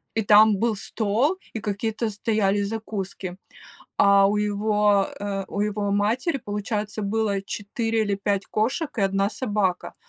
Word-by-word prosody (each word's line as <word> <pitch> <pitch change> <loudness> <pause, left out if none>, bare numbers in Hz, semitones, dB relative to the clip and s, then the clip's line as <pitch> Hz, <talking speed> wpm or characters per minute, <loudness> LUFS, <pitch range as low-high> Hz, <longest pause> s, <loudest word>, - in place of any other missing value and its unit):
И 225 - +2
там 210 0 +6
был 225 +2 +1
стол, 225 - 0 0.2
и 225 - -3
какие-то 215 +2 -2
стояли 205 -1 0
закуски. 200 -3 -5 0.6
А 200 0 +6
у 205 +1 +1
его, 210 -1 +2
э, 200 -1 -3
у - - -5
его 205 -1 -1
матери, 225 - +1
получается, 210 -1 -4
было 205 -1 0
4 225 +3 -2
или 205 -1 0
5 200 0 -1
кошек 260 +8 -1
и - - +1
1 195 +1 +1
собака. 205 -6 -1
210 Hz, 145 wpm, -24 LUFS, 200-220 Hz, 0.6 s, там